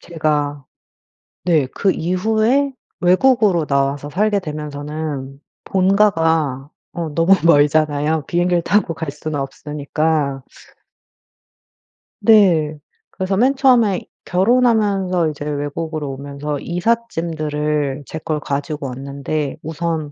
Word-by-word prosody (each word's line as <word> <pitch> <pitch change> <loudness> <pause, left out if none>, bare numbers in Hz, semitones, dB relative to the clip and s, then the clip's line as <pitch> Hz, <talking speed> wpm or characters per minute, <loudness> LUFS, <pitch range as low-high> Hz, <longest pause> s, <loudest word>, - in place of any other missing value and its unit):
제가 150 -4 -2 0.8
네 160 -6 +3
그 195 - +2
이후에 220 - +1 0.3
외국으로 185 -2 +3
나와서 140 +1 0
살게 205 +5 +1
되면서는 150 -3 -5 0.2
본가가 165 -8 +2 0.3
어 170 -2 -3
너무 170 +4 +5
멀잖아요. 150 -1 +3
비행기를 175 0 +1
타고 205 -2 +1
갈 160 -2 -4
수는 150 0 -4
없으니까. 145 0 -2 1.8
네. 170 -9 +4 0.3
그래서 190 +1 -2
맨 265 +5 +3
처음에 240 -8 +3 0.2
결혼하면서 195 -4 +2
이제 145 -1 -7
외국으로 150 +1 -3
오면서 140 +1 -5
이삿짐들을 155 -8 -1
제 - - -6
걸 155 0 -2
가지고 145 0 -3
왔는데 140 +3 -4
우선 160 -1 -3
155 Hz, 240 characters per minute, -19 LUFS, 145-185 Hz, 1.8 s, 너무